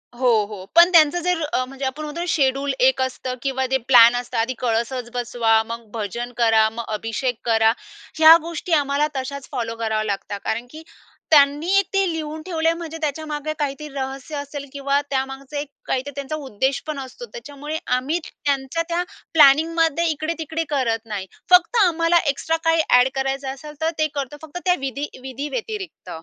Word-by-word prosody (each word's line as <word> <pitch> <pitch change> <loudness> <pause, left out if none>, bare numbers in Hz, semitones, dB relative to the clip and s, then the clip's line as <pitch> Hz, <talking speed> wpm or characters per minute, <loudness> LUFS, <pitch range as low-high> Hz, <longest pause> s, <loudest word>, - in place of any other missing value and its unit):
हो, 250 +1 +2 0.2
हो, 200 -3 -8
पण 340 +1 +8
त्यांचं 330 0 +5
जर 360 -1 0
अ, 255 - +2
म्हणजे 270 +1 -6
आपण 275 +4 -3
म्हणतो 300 +3 -5
शेड्युल 275 -3 +1
1 265 +1 +4
असतं 260 0 -3
किंवा 265 0 -1
जे 265 - +4
प्लॅन 240 -2 +8
असतं, 245 0 -4
आधी 230 +3 0
कळसच 240 +1 -1
बसवा, 230 -2 +2
मग 230 0 -6
भजन 235 +3 -4
करा, 225 -2 +4
मग 230 +1 -6
अभिषेक 225 +3 -2
करा, 225 -1 +4 0.5
ह्या 320 +1 +10
गोष्टी 335 +1 -4
आम्हाला 290 0 +2
तशाच 270 +1 -5
फॉलो 230 -4 -3
कराव्या 220 -1 -1
लागतात. 205 -1 -4
कारण 235 +2 -2
की 315 +1 -10 0.5
त्यांनी 305 +6 +5
ते 390 0 +3
लिहून 315 -1 -5
ठेवले 325 -1 -2
आहे, 330 - -1
म्हणजे 325 -1 -6
त्याच्यामागे 305 0 -3
काहीतरी 290 +1 -3
रहस्य 270 +2 -5
असेल 285 0 -6
किंवा 280 0 0
त्यामागचं 270 +1 -3
एक 290 +1 -3 0.2
काहीतरी 265 +2 -2
त्यांचा 280 +2 -4
उद्देश 265 -2 -2
पण 305 -2 -3
असतो. 270 - -8
त्याच्यामुळे 295 - -6 0.2
आम्ही 290 +7 -1
त्यांच्या 280 +3 -2
त्या 345 +1 0 0.3
प्लॅनिंगमध्ये 325 +2 +4
इकडे-तिकडे 320 +1 -3
करत 235 -6 0
नाही, 205 -4 -5 0.3
फक्त 360 +5 +6
आम्हाला 340 -1 +3
एक्स्ट्रा 320 +4 0
काही 325 -1 +3
ॲड 250 +1 +6
करायचं 270 0 -2
असेल, 300 +2 -10
तर 320 - +2
ते 310 - +2
करतो 280 0 -4
फक्त 315 +3 -7
त्या 360 -1 +4
विधीं 275 +1 -5
विधींव्यतिरिक्त. 330 - -6
280 Hz, 170 wpm, -22 LUFS, 250-315 Hz, 0.5 s, ह्या